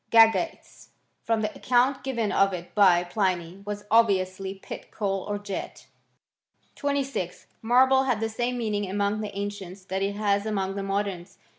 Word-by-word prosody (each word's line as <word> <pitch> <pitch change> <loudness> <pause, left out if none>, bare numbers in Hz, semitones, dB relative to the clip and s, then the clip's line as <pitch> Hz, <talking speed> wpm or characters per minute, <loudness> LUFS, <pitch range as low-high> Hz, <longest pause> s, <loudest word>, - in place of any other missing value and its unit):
Gagates, 225 +8 +3 0.3
from 225 -1 0
the 215 0 -2
account 255 +2 +2
given 235 -6 -1
of 195 0 +3
it 175 -1 -7
by 185 -4 +5
Pliny, 180 -1 -1
was 205 0 -5
obviously 195 -3 +2
pit 190 - -9
coal 195 -2 -2
or 205 - -1
jet.. 205 -1 -6 0.9
26. 275 - -2 0.2
Marble 260 +3 +4
had 250 -5 +1
the 225 - 0
same 240 +3 -2
meaning 210 -4 -1
among 205 +2 0
the 210 -1 -4
an 200 +1 -2
cients 190 -1 -10
that 190 +1 -1
it 200 +1 -1
has 205 0 +1
among 195 -3 -1
the 200 - -4
moderns. 195 -2 -3
205 Hz, 160 wpm, -26 LUFS, 195-225 Hz, 0.9 s, by